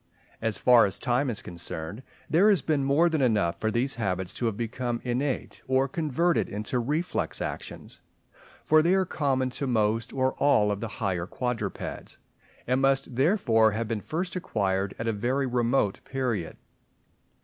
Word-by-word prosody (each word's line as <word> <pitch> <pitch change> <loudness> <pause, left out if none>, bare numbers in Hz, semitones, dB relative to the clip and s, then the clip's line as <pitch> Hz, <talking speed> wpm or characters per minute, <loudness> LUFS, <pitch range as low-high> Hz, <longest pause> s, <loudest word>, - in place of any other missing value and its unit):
As 110 -3 0
far 120 -4 +6
as 95 - -2
time 125 +3 0
is 115 - -4
concerned, 85 +3 -5 0.3
there 185 +7 +4
has 195 -9 +3
been 150 -3 +1
more 140 +5 +4
than 160 -3 0
enough 105 -9 +1
for 110 - 0
these 120 +5 0
habits 95 -3 -2
to 120 - -1
have 105 -3 -2
become 120 +1 -2
innate 130 +2 -2
or 130 +1 +2
converted 165 +3 0
into 105 +5 -2
reflex 150 +8 -2
actions; - - -6 0.6
for 155 0 +5
they 175 +4 +3
are 190 -1 +2
common 135 -5 0
to 140 +2 -4
most 115 -1 +1
or 130 0 0
all 105 -8 +3
of 100 - -2
the 115 - -3 0.2
higher 90 -3 -1
quadrupeds, 125 0 -4 0.5
and 130 +2 +1
must 135 -2 +1
therefore 120 - +3
have 115 +1 -2
been 110 -2 -2
first 175 - -3
acquired 100 - -1
at 115 - -4
a 115 - +1
very 125 +6 0
remote 120 -4 +1
period. 125 -10 -3
125 Hz, 165 wpm, -27 LUFS, 110-140 Hz, 0.6 s, far